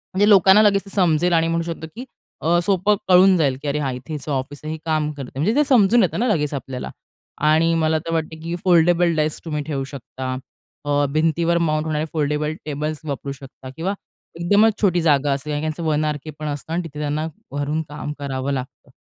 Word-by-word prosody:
म्हणजे 205 +2 +4
लोकांना 195 +1 +7
लगेच 200 -2 +3
ते - - -11
समजेल 175 -2 +2
आणि 165 0 +3
म्हणू 165 0 0
शकतो 165 -1 -6
की 250 +3 -7 0.4
अ, 170 +2 +3
सोपं 195 +2 +2
कळून 185 +1 +6
जाईल 140 -5 +1
की 150 - -5
अरे, 145 +1 0
हां 135 -3 -1
इथे 125 - -7
त्याचं 150 -1 -5
ऑफिस 135 +1 -3
आहे. 155 - -4
हे - - -5
काम 155 -1 0
करतंय. 135 -3 -8
म्हणजे 210 - +1
ते 295 - +4
समजून 235 -3 +5
येतं 185 - -1
ना 245 - +1
लगेच 150 - 0
आपल्याला. 135 -1 -5 0.6
आणि 165 +2 +4
मला 160 -1 +2
तर 165 +1 -5
वाटतं 160 -1 -2
की 170 +1 -3
फोल्डेबल 175 -1 +4
डाइस 155 0 0
तुम्ही 150 -2 -2
ठेवू 145 -3 -3
शकता. 130 -1 -8 0.6
अ, 145 0 +2
भिंतीवर 165 +2 +2
माउंट 155 -2 0
होणारे 155 0 -1
फोल्डेबल 150 0 0
टेबल्स 150 +1 -3
वापरू 140 -1 -4
शकता 135 -1 -11
किंवा 185 +5 -1 0.5
एकदमच 205 +5 +3
छोटी 180 -4 +3
जागा 145 -3 +3
असते 140 +2 -4
आणि 145 0 -2
त्यांचं 155 +2 -3
वन 155 -1 +1
आरकेपण 150 0 -4
असतं 145 +2 -5
आणि 175 - -1
तिथे 150 -2 -8
त्यांना 150 +1 -1 0.3
घरून 150 +2 -1
काम 150 0 -5
करावं 135 -1 -3
लागतं. 130 +1 -6
155 Hz, 205 wpm, -21 LUFS, 145-170 Hz, 0.6 s, लोकांना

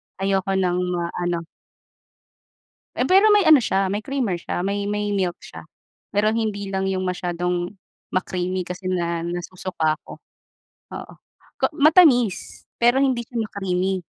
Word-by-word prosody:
Ayoko 195 0 0
ng 180 -2 +1 0.2
ma-ano. 175 0 -2 1.5
Eh, - - 0
pero 395 +3 +6
may 415 - +5
ano 310 -2 +9
siya, 195 -5 0
may 205 +2 -3
creamer 250 -10 -1
siya, 175 - -4
may 200 +1 -1
may 210 0 -1
milk 180 -3 -1
siya - - -11 0.5
pero 215 +1 +3
hindi 205 -3 -2
lang 190 0 -1
yung 190 -1 -1
masyadong 180 0 -2 0.3
ma-creamy 185 0 -2
kasi 180 +1 -6
nga 170 -2 -1
nasusuka 175 -2 -2
ako, - - -11 0.8
oo. - - -10 0.5
K - - -21
matamis, 285 - +4
pero 240 +2 +4
hindi 260 -3 +2
siya 240 +1 -11
ma-creamy. 190 -3 -1
190 Hz, 135 wpm, -22 LUFS, 180-220 Hz, 1.5 s, ano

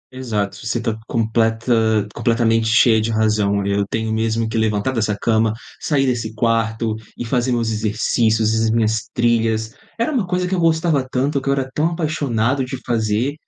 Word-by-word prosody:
Exato. 105 -6 -2
Você 115 - -1
está 115 -2 -2
completa 110 -1 +1
completamente 115 -1 +1
cheia 115 0 +4
de 110 - -1
razão. 105 -2 +1
Eu 100 0 +1
tenho 110 0 -2
mesmo 110 0 0
que 110 0 -1
levantar 110 +2 0
dessa 110 -4 0
cama, 110 -1 +2 0.3
sair 140 -3 +1
desse 115 -4 -2
quarto 115 0 0 0.2
e 120 - -4
fazer 125 +1 0
meus 115 -2 0
exercícios 110 +1 +1
e 110 0 +1
as - - +1
minhas 110 -1 0
trilhas, 115 -1 +1 0.3
era 235 +7 +1
uma 235 -10 0
coisa 180 0 -1
que 185 - -3
eu 185 - +1
gostava 160 -3 +2
tanto, 135 +2 0
que 135 - -3
eu - - +4
era 135 -1 -1
tão 155 +2 +1
apaixonado 140 -6 0
de 130 +1 -5
fazer. 115 +3 0
115 Hz, 180 wpm, -19 LUFS, 110-130 Hz, 0.3 s, cheia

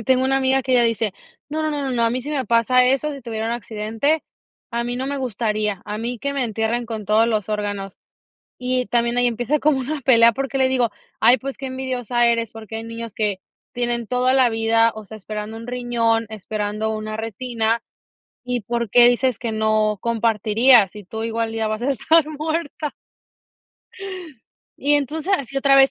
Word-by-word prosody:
ay, 225 - -9
tengo 260 0 +3
una 270 0 +2
amiga 265 0 +2
que 260 - -1
ella 245 -1 +5
dice: 225 -3 0 0.4
“No, 310 +1 -2
no, 310 - 0
no, 290 -1 -2
no, 270 - -2
no, 235 -2 +1
a 230 - +2
mí 255 +1 -1
sí 290 +4 -6
me 275 -3 -1
pasa 235 +3 +4
eso, 275 +4 +1
si 275 - -8
tuviera 225 -1 -3
un 230 - -1
accidente, 225 +6 -1 0.5
a 235 0 -2
mí 245 +1 -3
no 260 +1 -3
me 285 - -2
gustaría, 215 -5 -2
a 210 0 -5
mí 240 +1 -4
que 280 +3 -2
me 275 -3 -1
entierren 225 +2 -1
con 220 -2 -5
todos 215 +2 +3
los 215 -3 -1
órganos”. 205 -2 -3 0.6
Y 250 0 0
también 235 0 +1
ahí 245 - +3
empieza 245 +5 0
como 300 -2 +3
una 285 +3 -3
pelea 235 -3 +6
porque 270 +1 -3
le 260 -1 +3
digo: 250 -3 +1 0.3
“Ay, 250 +2 +6
pues 275 +3 -6
qué 270 - -5
envidiosa 250 -2 -1
eres, 230 -2 +1
porque 220 0 -8
hay 225 - -6
niños 230 -1 -7
que 210 -3 -1 0.3
tienen 240 -2 -2
toda 250 +1 +2
la 260 -2 +5
vida, 225 0 +3
o 215 -1 -8
sea, 220 - -10
esperando 215 +2 -6
un 230 +1 -9
riñón, 235 -2 0
esperando 215 0 -3
una 215 0 -4
retina, 225 +1 -2 0.6
¿y 250 -2 -2
por 235 +1 -2
qué 240 +3 +7
dices 245 -1 +2
que 235 -2 -3
no 215 -1 +1
compartirías, 225 0 +4
si 210 -1 -10
tú, 220 +4 -6
igual, 225 0 -2
ya 225 -1 -1
vas 215 +1 -3
a 275 - +1
estar 310 +4 +4
muerta?" 310 0 -3 1.9
Y 290 +2 +2
entonces, 305 +6 -1
así 275 0 -7
otra 275 0 +4
vez. 270 0 +7
235 Hz, 200 wpm, -21 LUFS, 220-260 Hz, 1.9 s, qué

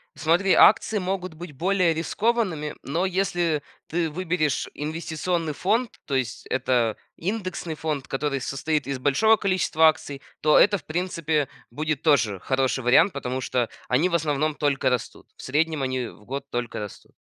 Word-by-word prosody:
Смотри, 165 +6 +2
акции 215 +1 +5
могут 185 -3 -3
быть 165 -1 -9
более 180 +3 +2
рискованными, 175 -2 -1
но 165 +7 -1
если 175 -5 0 0.2
ты 165 0 -1
выберешь 160 -4 -1
инвестиционный 160 +1 -2
фонд, 220 - -1
то 140 - -2
есть 125 -4 -2
это 120 -4 +1 0.2
индексный 185 -3 -3
фонд, 150 -3 -3
который 140 0 -1
состоит 140 +1 -2
из 140 -2 -3
большого 215 +12 +4
количества 185 -5 +3
акций, 140 -3 -1 0.2
то 150 0 +5
это 205 0 +5
в 165 - -15
принципе 160 -2 -1 0.2
будет 150 +3 -2
тоже 115 - +2
хороший 130 0 0
вариант, 150 +10 +5
потому 130 -2 -3
что 125 -2 -1 0.2
они 145 +9 +2
в 170 - 0
основном 155 -1 0
только 140 -2 +1
растут. 125 -2 -4
В - - -11
среднем 155 +2 0
они 130 -2 -1
в 105 - -14
год 135 +4 -5
только 120 -1 -3
растут. 105 -2 -9
155 Hz, 155 wpm, -25 LUFS, 135-180 Hz, 0.2 s, акции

